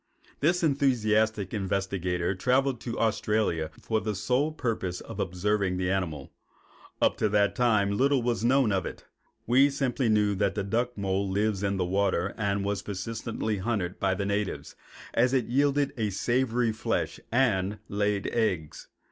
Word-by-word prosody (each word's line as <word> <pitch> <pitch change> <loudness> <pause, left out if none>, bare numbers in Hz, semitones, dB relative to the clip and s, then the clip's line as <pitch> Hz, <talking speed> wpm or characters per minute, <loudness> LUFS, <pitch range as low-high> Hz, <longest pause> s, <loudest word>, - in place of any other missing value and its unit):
This 175 +4 +2
enthusiastic 110 - +1
investigator 95 -3 -1
traveled 130 +5 +1
to 120 -2 -4
Australia 105 -7 0
for 110 -1 -1
the 110 -1 -2
sole 130 +9 +1
purpose 110 - -2
of - - -9
observing 95 +1 0
the 90 0 0
animal. 80 -8 -3 0.7
Up - - +2
to 110 - +1
that 100 -1 +2
time 110 -5 +2
little 135 +1 +2
was 120 -2 -1
known 130 -1 +3
of 95 -2 0
it. - - -9 0.4
We 130 +4 +5
simply 135 -3 0
knew 105 -1 +3
that 100 0 0
the 100 - -1
duck 120 +4 -1
mole 100 0 -1
lives 100 0 0
in 100 -1 0
the 90 - 0
water 95 0 0
and 100 -2 -1
was 100 -1 -1
persistently 110 +2 -3
hunted 95 -3 -2
by 95 -1 +1
the 100 - -2
natives, 100 0 -2 0.4
as 125 +3 +3
it 125 -4 +2
yielded 140 +2 +1
a 110 -4 -1
savory 120 +3 +1
flesh 110 - -2
and 105 -5 +1
laid 105 0 0
eggs. 90 -10 -1
105 Hz, 155 wpm, -28 LUFS, 95-120 Hz, 0.7 s, We